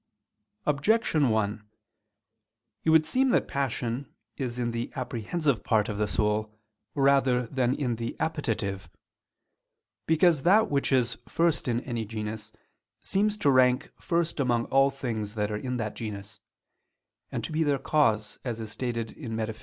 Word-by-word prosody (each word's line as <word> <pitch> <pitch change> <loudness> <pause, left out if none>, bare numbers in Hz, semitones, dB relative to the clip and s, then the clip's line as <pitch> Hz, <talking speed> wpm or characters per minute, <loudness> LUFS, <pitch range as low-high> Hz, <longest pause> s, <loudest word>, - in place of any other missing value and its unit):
Objection 150 - +2
1: 110 -1 0 1.2
It - - +3
would 160 -1 +6
seem 260 +7 +2
that - - +2
passion 130 -1 -2 0.2
is 125 -3 -4
in 120 -1 -1
the 115 +1 -4
apprehensive 130 - -1
part 110 0 +2
of 105 -1 -3
the 105 - +1
soul 105 +1 -1 0.4
rather 135 -3 +3
than 130 +1 0
in 125 -6 -1
the 115 0 -5
appetitive. 105 - -2 1.2
Because 160 -1 +4
that 205 +6 +4
which 140 -1 +1
is 125 -3 +1
first 165 -3 +1
in 120 0 0
any 120 -4 -3
genus, 110 0 -5 0.5
seems 210 +2 0
to 145 -9 +3
rank 125 -1 +3
first 170 -2 0
among 120 -3 +1
all 135 +1 +4
things 115 -6 -4
that 105 -1 -1
are - - -1
in 125 +4 -3
that 110 -2 -3
genus, 105 -3 -7 0.9
and - - -3
to - - -2
be 155 +1 0
their 145 -3 +2
cause, 115 -9 +1
as 120 -3 -3
is 110 -1 -5
stated 115 -2 -3
in 120 -7 -7
_Metaph. 110 0 -3
125 Hz, 155 wpm, -28 LUFS, 110-145 Hz, 1.2 s, would